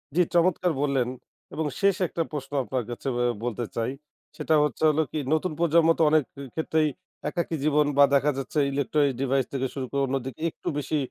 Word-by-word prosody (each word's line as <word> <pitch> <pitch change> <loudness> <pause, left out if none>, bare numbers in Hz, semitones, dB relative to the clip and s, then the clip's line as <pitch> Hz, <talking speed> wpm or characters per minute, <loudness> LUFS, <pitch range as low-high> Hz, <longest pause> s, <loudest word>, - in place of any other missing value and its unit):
জ্বী, 180 - +5
চমৎকার 175 0 +3
বললেন। 135 -4 +1 0.5
এবং 160 - -2
শেষ 195 -1 +3
১ - - -6
টা 165 - +3
প্রশ্ন 145 -2 -6
আপনার 125 -1 -2
কাছে 120 +3 -6
অ্যা 120 0 +1 0.2
বলতে 120 -1 -2
চাই। 115 +2 -1 0.5
সেটা 160 - +1
হচ্ছে 150 +1 -2
হলো 155 +1 +2
কি? 155 - -3 0.2
নতুন 160 +2 0
প্রজন্ম 165 0 +4
তো - - +5
অনেক 155 -2 +4
ক্ষে 140 - -10
ক্ষেত্রেই 160 -1 +1 0.4
একাকী 170 -1 -2
জীবন 150 0 +3
বা 145 - +8
দেখা 145 +2 +3
যাচ্ছে 135 +3 -2
ইলেকট্রনিক 140 0 +1
ডিভাইস 135 -1 +1
থেকে 130 -1 0
শুরু 135 -2 -3
করে, 140 0 0
অন্যদিকে 135 +2 -4
একটু - - -13
বেশি 145 +2 -1
145 Hz, 195 wpm, -26 LUFS, 135-160 Hz, 0.5 s, বা